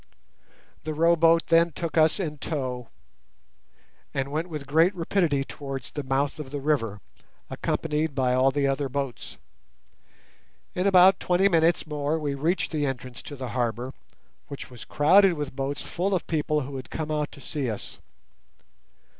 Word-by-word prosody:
The 155 0 -4
row 165 +2 +4
boat 165 0 +4
then 165 0 +4
took 170 +1 -4
us 160 +3 +4
in 150 -6 -3
tow, 130 -6 -4 1.3
and 140 0 -1
went 160 +4 -2
with 150 -4 -5
great 165 +7 +3
rapidity 165 -5 +1
towards 135 -3 -7
the 145 - -4
mouth 135 +2 -1
of 145 -3 -6
the 145 +1 -4
river, 125 -8 -1 0.5
accompanied 155 -2 -1
by 130 -2 +2
all 130 +1 +4
the 140 +1 0
other 135 0 0
boats. 135 -2 -4 1.4
In 180 +2 0
about 190 0 +6
twenty 180 +2 +3
minutes 170 -1 +3
more 150 0 -1
we 150 -3 -2
reached 160 +7 0
the 150 -2 0
entrance 125 -2 -5
to 145 - -8
the 130 -2 -5
harbour, 120 +3 -2 0.5
which 140 -2 -8
was 120 -3 -10
crowded 185 +6 +5
with 145 -4 -5
boats 135 +1 -3
full 190 +3 -1
of 180 - -2
people 150 -1 0
who 135 0 -6
had 130 - -8
come 155 -1 -4
out 150 -1 -1
to - - -12
see 140 -2 -3
us. 105 -2 -7
150 Hz, 165 wpm, -26 LUFS, 135-165 Hz, 1.4 s, about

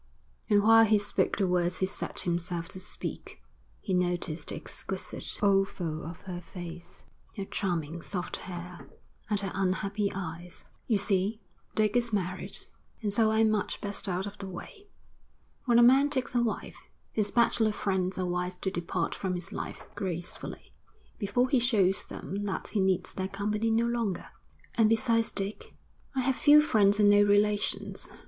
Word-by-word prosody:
And 205 -1 +4
while 225 +1 +8
he 215 -1 +4
spoke 205 0 0
the 195 - +2
words 180 0 +2
he 190 - +2
set 190 - -3
himself 170 -1 -2
to 185 - -6
speak, 185 - -4 0.4
he 190 - -3
noticed 175 -3 -1
the - - -3
exquisite 190 -1 -5
oval 195 -5 +1
of 165 +1 -8
her 180 -2 -6
face, 175 -1 -10 0.3
her 195 - -3
charming, 170 -5 -2
soft 180 0 -3
hair, 175 -5 -8 0.4
and 210 -2 +2
her 195 -2 -3
unhappy 195 +2 0
eyes. 175 -1 -7 0.2
'You 220 - +3
see, 200 +2 +1 0.4
Dick 215 0 +2
is 240 -1 +2
married, 185 -3 -1 0.4
and 205 -2 0
so 220 +1 +4
I'm 220 0 +3
much 210 -2 -1
best 205 0 -3
out 185 +1 -1
of 205 0 -8
the 195 - -6
way. 410 - -10 0.8
When 240 -2 +4
a 240 - +7
man 270 +4 +6
takes 260 -4 -2
a 240 - +3
wife, 230 -2 -3 0.3
his 210 -2 +1
bachelor 230 -1 +3
friends 190 -3 -1
are 185 - -1
wise 180 0 -2
to 190 - -2
depart 170 -1 -2
from 185 -2 -2
his 175 -1 -4
life, - - -5
gracefully, 175 -3 -5 0.5
before 240 +4 +1
he 260 -1 +3
shows 205 -6 +3
them 200 +2 -6
that 195 - -3
he 210 - -1
needs 190 -1 +1
their 190 0 -2
company 210 +3 -1
no 225 +1 +2
longer.' 230 -6 -2 0.4
'And 225 -2 +4
besides 230 0 +2
Dick?' 195 +1 -4 0.4
'I 260 - +2
have 260 +1 +1
few 295 +3 +7
friends 205 -7 +4
and 205 - +6
no 205 0 +6
relations. 205 0 +2
200 Hz, 170 wpm, -29 LUFS, 180-220 Hz, 0.8 s, while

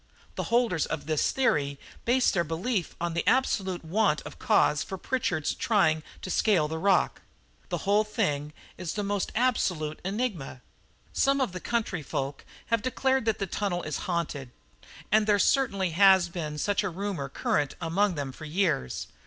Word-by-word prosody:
The - - -3
holders 230 -9 +2
of 150 - -4
this 155 -1 +1
theory 145 - +1 0.3
base 250 +2 +3
their 175 -4 +1
belief 175 +5 -2
on 170 -1 -2
the 170 - 0
absolute 190 -9 +1
want 185 -2 +2
of - - -10
cause 210 - +3
for 190 - -5
Pritchard's 180 - -1
trying 175 -8 +2 0.2
to 185 - -4
scale 180 -8 +3
the 160 +1 -4
rock. 195 +1 +2 0.5
The - - -3
whole 205 +2 +4
thing 150 -9 -1 0.3
is 180 -3 -3
the 205 - -1
most 200 -1 -1
absolute 180 -11 0
enigma. 190 - -3 0.5
Some 275 +1 +2
of 260 -7 0
the 185 - -6
country 215 -5 -2
folk 140 0 -4 0.3
have 230 - +3
declared 265 +1 +1
that 220 -2 +1
the 200 - -2
tunnel 185 -1 -2
is 155 -2 -3
haunted 155 -6 -2 0.6
(and 215 +1 +4
there 205 -1 +4
certainly 200 -5 +2
has 190 0 +6
been 155 -4 -4
such 205 +7 +1
a 200 - -1
rumour 185 -6 -4
current 145 +1 0
among 180 +3 +1
them 140 -2 -3
for 155 - -10
years). 155 - 0
185 Hz, 170 wpm, -28 LUFS, 155-215 Hz, 0.6 s, has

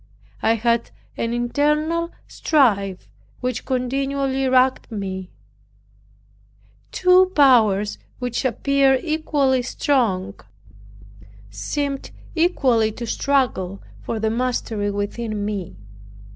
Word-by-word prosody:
I 225 - +3
had 235 +1 0 0.3
an 230 - -2
internal 300 +7 0 0.2
strife, 200 - +1 0.3
which 250 -2 -3
continually 270 +1 -1
racked 255 -1 +2
me 190 -3 -5 1.6
two 365 0 +5
powers 220 -8 +4 0.2
which 245 -2 -3
appeared 270 +1 +2
equally 295 -5 +1
strong 225 -7 0 1.2
seemed 275 - -3 0.2
equally 260 -10 +2
to 235 - -6
struggle 225 -8 0 0.2
for 225 - -4
the 220 0 0
mastery 230 -3 -1
within 205 +1 -3
me. 200 - -4
250 Hz, 90 wpm, -22 LUFS, 215-275 Hz, 1.6 s, two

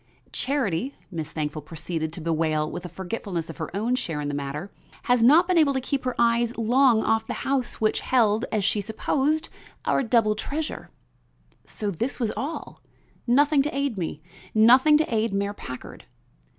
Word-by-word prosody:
"Charity," 260 - -1 0.2
Miss 160 -3 -5
Thankful 155 -1 -3
proceeded 160 +1 -4
to 170 - -7
bewail 155 -1 0
with 175 0 -6
a - - -6
forgetfulness 180 -2 -4
of - - -14
her 160 - -4
own 230 +4 0
share 165 -12 -2
in 145 0 -3
the - - -3
matter, 145 +6 -4 0.3
"had 245 -1 +3
not 305 +9 +6
been 365 -2 +3
able 290 -3 +4
to - - +2
keep 265 +1 -3
her 255 - -1
eyes 235 0 +2
long 235 0 +4
off 220 0 +1
the - - -3
house 265 -3 0
which 215 -1 +1
held, 225 -2 +2
as 215 -2 0
she 205 - +1
supposed, 275 - 0 0.4
our - - +2
double 230 -3 +3
treasure." 295 +8 -4 0.8
So 210 -2 -3
this 235 +11 -3
was 230 -4 0
all! 275 +9 -5 0.5
Nothing 285 +4 +4
to 285 0 -2
aid 275 -7 -1
me; 155 -3 -4 0.3
nothing 255 +7 +7
to 310 -5 -1
aid 220 -2 +1
Mayor 200 +1 -1
Packard. 130 -10 -9
220 Hz, 175 wpm, -25 LUFS, 170-265 Hz, 0.8 s, nothing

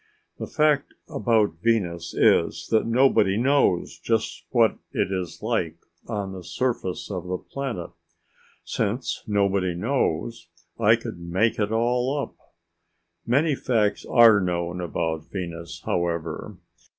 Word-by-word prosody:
The - - -4
fact 150 -2 +1
about 115 -8 +1
Venus 90 -7 0
is - - +3
that 110 0 +3
nobody 115 -5 +3
knows 120 -10 +2
just 110 +5 -1
what 115 -3 +3
it 95 - -1
is 90 -1 -4
like 110 -8 -1 0.3
on 100 -4 -3
the 95 -1 -8
surface 115 -5 -2
of 90 -2 -4
the 90 0 -1
planet. 125 -7 -5 0.7
Since 115 +4 -2
nobody 100 -3 +1
knows, 110 - -1 0.3
I 110 0 +6
could 115 -5 -7
make 95 +8 0
it 105 0 0
all 125 +4 +1
up. 140 - -4 0.9
Many 145 +6 +3
facts 115 -6 0
are 115 -3 +7
known 90 0 -2
about 80 -2 -3
Venus, 85 -3 -6
however. 85 -1 -2
105 Hz, 125 wpm, -25 LUFS, 90-120 Hz, 0.9 s, are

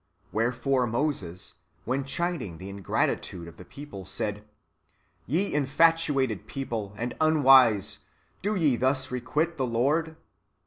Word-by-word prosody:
Wherefore 125 +3 +1
Moses, 115 - -2 0.3
when 130 +3 -1
chiding 160 - -3
the 95 +3 -8
ingratitude 95 -3 -2
of 85 0 -12
the - - -10
people, 140 -5 -9
said, 100 +2 -3 0.4
" - - -42
Ye 175 - 0
infatuated 145 - +2
people, 110 -7 -4
and 120 +2 -3
unwise, 135 -9 +5 0.4
do 210 +2 0
ye 150 -9 +2
thus 130 +1 0
requite 150 +7 -1
the 130 -2 0
Lord?" 150 +8 +1
130 Hz, 125 wpm, -27 LUFS, 105-150 Hz, 0.4 s, unwise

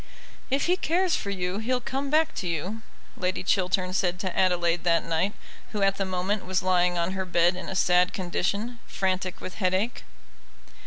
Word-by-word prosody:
"If 275 +1 +1
he 360 +1 +2
cares 355 +1 +1
for 200 - -3
you 185 0 -2
he'll 250 +3 0
come 270 +3 -3
back 315 +2 +3
to 185 - -2
you," 180 +7 -3 0.3
Lady 185 0 -2
Chiltern 185 -1 +1
said 180 -2 +1
to 185 -2 -3
Adelaide 175 -2 +2
that 170 -1 +2
night, 165 +5 0 0.4
who 205 -2 0
at 195 0 +3
the 195 - 0
moment 185 +2 -1
was 185 0 -1
lying 180 -1 +3
on 170 +1 0
her 190 0 -2
bed 175 0 +3
in 185 - -6
a 190 - -4
sad 180 0 +4
condition, 200 +6 -2
frantic 185 -1 -1
with 185 - -7
headache. 185 +6 0
185 Hz, 180 wpm, -27 LUFS, 180-205 Hz, 0.4 s, sad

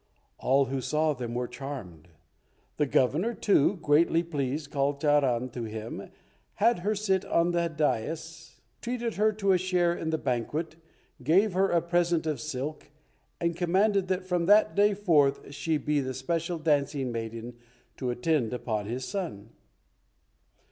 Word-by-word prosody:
All 135 +2 +3
who 135 0 -3
saw 155 +3 +1
them 120 -3 -5
were 125 0 -1
charmed. 120 - -8 0.7
The 150 - +1
Governor, 155 - +1
too, 200 -1 +3
greatly 165 +3 +3
pleased, 145 -2 -3
called 140 0 0
Charan 135 -5 +2
to 120 -1 -5
him, 110 +1 -6 0.5
had 230 +1 +3
her 210 +4 0
sit 195 -2 +1
on 170 -3 +1
the 170 -1 +1
dais, 160 +2 -3 0.2
treated 240 -2 -3
her 215 +1 +3
to 200 -2 +1
a 185 - +4
share 180 -2 +1
in 165 -2 -4
the 160 - 0
banquet, 145 +5 -2 0.5
gave 180 - +3
her 190 +1 +2
a 170 -2 +2
present 170 -1 +1
of 150 -6 -2
silk, 150 +2 -5 0.5
and 170 0 0
commanded 190 +3 +2
that 185 0 -1
from 180 -2 0
that 210 +1 +5
day 205 0 +3
forth 150 -8 +2
she 155 +3 0
be 150 0 0
the 130 -2 -3
special 165 +6 -2
dancing 145 -4 0
maiden 115 +1 -6 0.4
to 130 - -2
attend 125 -1 0
upon 110 -4 -3
his 125 +3 -4
son. 160 - -5
155 Hz, 155 wpm, -28 LUFS, 130-175 Hz, 0.7 s, that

